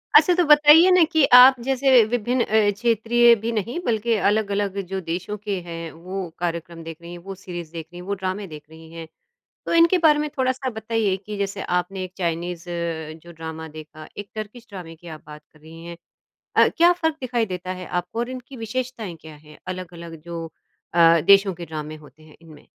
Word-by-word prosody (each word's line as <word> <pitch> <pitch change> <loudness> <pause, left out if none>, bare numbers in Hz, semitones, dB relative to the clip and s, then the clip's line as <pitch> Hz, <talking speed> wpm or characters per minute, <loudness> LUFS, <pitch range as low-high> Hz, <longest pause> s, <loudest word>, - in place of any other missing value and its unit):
अच्छा, 360 - +7
तो 355 - +3
बताइए 300 +4 +7
ना 365 -2 +6
कि 315 -4 +3
आप 250 +1 +9
जैसे 265 -2 +4
विभिन्न 245 +2 -1
अ, 215 -1 +2
क्षेत्रीय 235 +2 +3
भी 230 - -1
नहीं, 230 - -3
बल्कि 230 0 0
अलग-अलग 205 -2 -1
जो 190 +1 -4
देशों 180 +5 -4
के 205 0 -4
हैं, 165 -1 -6
वो 180 +2 -6
कार्यक्रम 170 -1 -4
देख 165 -1 -8
रही 170 - -10
हैं, 175 - -9
वो 195 +3 -9
सीरीज़ 175 -4 -8
देख 165 -1 -6
रही 175 - -10
हैं, 180 - -10
वो 200 - -1
ड्रामे 190 +1 -4
देख 155 -3 -11
रही 160 0 -15
हैं। 165 -1 -8 0.6
तो - - -2
इनके 335 +2 +5
बारे 305 -3 +4
में 300 0 -1
थोड़ा-सा 260 0 -1
बताइए 220 -3 -1
कि 205 +2 -8
जैसे 200 0 -3 0.2
आपने 185 +2 -5
एक 180 - -10
चाइनीज़, 170 0 -3 0.6
जो 170 - -13
ड्रामा 160 0 -8
देखा, 155 0 -12
एक 205 0 -7
टर्किश 215 +2 -8
ड्रामे 180 -5 -9
की 170 +1 -14
आप - - -21
बात 150 0 -11
कर 155 - -22
रही 165 +2 -13
हैं। 170 0 -8 0.6
अ, - - +6
क्या 345 +1 +6
फ़र्क 320 -3 -1
दिखाई 240 -2 -1
देता 185 -2 -6
है 185 - -7 0.2
आपको 180 +6 -8
और 240 +1 -2
इनकी 255 +1 -9
विशेषताएँ 225 -4 -5
क्या 160 -1 -12
हैं, 150 0 -17
अलग-अलग 170 -3 -8
जो 165 -1 -7 0.5
अ, 165 -1 +6
देशों 195 -1 +6
के 170 0 -9
ड्रामे 155 -1 -7
होते 155 +1 -18
हैं, 155 -1 -17
इनमें? 155 -3 -15
195 Hz, 205 wpm, -22 LUFS, 165-235 Hz, 0.6 s, आप